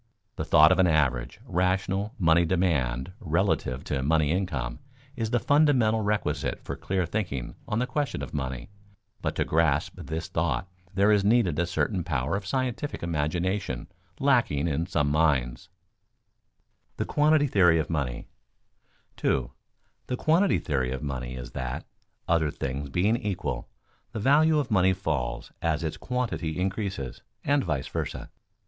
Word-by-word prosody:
The - - -3
thought 75 +1 +7
of - - +3
an 95 - +5
average, 65 -7 +1
rational, 95 +3 0
money 85 -3 +4
demand 80 -7 0
relative 85 - 0
to 65 - -2
money 75 +1 +2
income 75 -10 -2 0.4
is 115 -4 -2
the 120 - +2
fundamental 130 -6 +3
requisite 100 -8 -1
for - - -4
clear 95 -2 -1
thinking 85 - -3
on 105 - -1
the 125 - +1
question 140 +2 -2
of - - -7
money, 65 +3 -4 0.5
but - - -2
to - - 0
grasp 80 -2 +1
this 80 +1 -4
thought 95 - -1 0.2
there 100 +3 +3
is 105 -2 +4
needed 100 -7 +3
a 85 - +1
certain 90 +1 0
power 70 -1 -1
of 100 -1 -4
scientific 130 +1 -2
imagination 85 -2 -1 0.3
lacking 120 - +2
in 80 +2 -1
some 75 -5 +1
minds. 70 -5 +1 1.2
[Sidenote: - - -44
The - - -1
quantity 150 0 +3
theory 90 - +4
of 80 0 -1
money] 70 -6 -2 0.9
2. 60 -3 0 0.6
_The 125 - -2
quantity 170 +8 +3
theory 65 -3 -1
of 65 +2 -4
money 65 -3 -4
is 60 -1 -7
that, 65 -1 -4 0.4
other 80 -2 +2
things 70 0 -4
being 100 +10 +2
equal, 95 - -3 0.4
the 110 - -3
value 150 +7 +4
of 140 -5 -1
money 95 -2 +4
falls 75 -10 -3
as 85 0 0
its 80 - -3
quantity 115 -10 -2
increases, 95 - -3 0.2
and 140 0 +2
vice 75 -7 -2
versa. - - -4
85 Hz, 150 wpm, -27 LUFS, 70-105 Hz, 1.2 s, thought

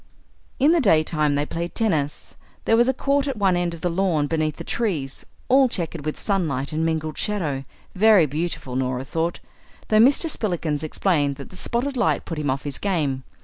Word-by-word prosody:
In 285 +4 +5
the 340 -1 +3
daytime 155 - +2
they 145 +1 0
played 170 +3 -5
tennis. 155 -10 -1 0.3
There 225 - +4
was 240 +2 +4
a - - +5
court 280 +2 0
at 270 -4 -3
one 195 -3 +2
end 175 -1 -1
of 165 - -13
the 175 - 0
lawn 170 -4 +1
beneath 155 0 -1
the - - -7
trees, 165 - -3 0.2
all 265 0 +5
chequered 165 -6 -4
with 155 - -3
sunlight 155 -8 -1
and 160 +1 0
mingled 160 -1 -2
shadow; 160 -11 -2 0.3
very 205 -3 +5
beautiful, 150 -3 -4
Norah 130 0 -1
thought, 165 +4 -2 0.5
though 215 - +4
Mr. 270 +8 +5
Spillikins 170 - -1
explained 155 -3 0
that 140 - -10
the - - -12
spotted 250 +7 -2
light 240 - +1
put 165 -3 -5
him 145 -2 -1
off 135 +1 -1
his 145 -2 -3
game. 150 -9 -1
165 Hz, 190 wpm, -23 LUFS, 150-210 Hz, 0.5 s, In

